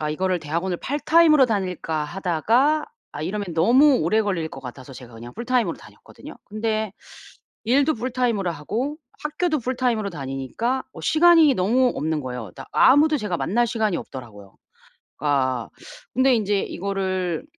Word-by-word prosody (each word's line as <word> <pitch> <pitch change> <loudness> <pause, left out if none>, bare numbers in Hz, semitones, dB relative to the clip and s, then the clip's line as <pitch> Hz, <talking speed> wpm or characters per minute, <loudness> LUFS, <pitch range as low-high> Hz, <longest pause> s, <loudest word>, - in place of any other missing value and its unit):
...아 150 - -2
이거를 185 +3 0
대학원을 170 +4 -2
파트타임으로 305 +1 +4
다닐까 180 -7 -2
하다가 200 - +1 0.3
아 145 - -6
이러면 200 +3 -3
너무 255 - +5
오래 215 +8 +2
걸릴 185 -6 -2
것 135 - -10
같아서 130 +1 -10
제가 120 -2 -12
그냥 120 +2 -10
풀타임으로 245 0 0
다녔거든요. - - -14
근데 215 -1 -2 0.7
일도 275 +6 +3
풀타임으로 235 -6 -1
하고 225 - -3 0.3
학교도 310 +1 -1
풀타임으로 245 -4 -1
다니니까 140 - -3
어 - - -10
시간이 325 -2 +5
너무 240 +6 +2
없는 155 0 -2
거예요. 125 -4 -6
다 - - -9
아무도 300 +3 +5
제가 205 -7 -2
만날 235 +8 +1
시간이 215 -5 0
없더라고요. 105 -7 -11 0.6
그러니까 130 -5 0 0.5
근데 260 0 +4
인제 205 -3 +1
이거를 185 -2 -3
200 Hz, 370 characters per minute, -23 LUFS, 160-255 Hz, 0.7 s, 너무